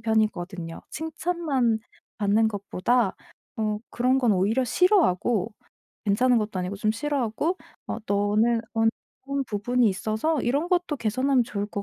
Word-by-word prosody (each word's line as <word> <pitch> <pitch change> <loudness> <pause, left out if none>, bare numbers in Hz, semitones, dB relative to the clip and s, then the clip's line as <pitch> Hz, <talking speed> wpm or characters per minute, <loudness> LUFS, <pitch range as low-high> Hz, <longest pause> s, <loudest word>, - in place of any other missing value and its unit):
편이거든요. 195 -6 -1
칭찬만 315 -7 -1 0.4
받는 215 +1 +3
것보다 205 +2 0 0.4
어 215 -1 0
그런 255 +2 +2
건 245 -4 +3
오히려 210 +7 +2
싫어하고 235 - +2 0.5
괜찮은 245 +5 +3
것도 210 -3 -3
아니고 180 +2 -3
좀 215 +2 +1
싫어하고 290 - -1 0.3
어 - - -3
"너는 210 +3 +2
어떤 265 +5 -2
부분이 235 +3 +1
있어서 220 +10 0
이런 285 +8 0
것도 355 -4 +1
개선하면 255 +2 +1
좋을 205 -3 -3
것 205 -1 -5
225 Hz, 300 characters per minute, -25 LUFS, 205-265 Hz, 0.5 s, 받는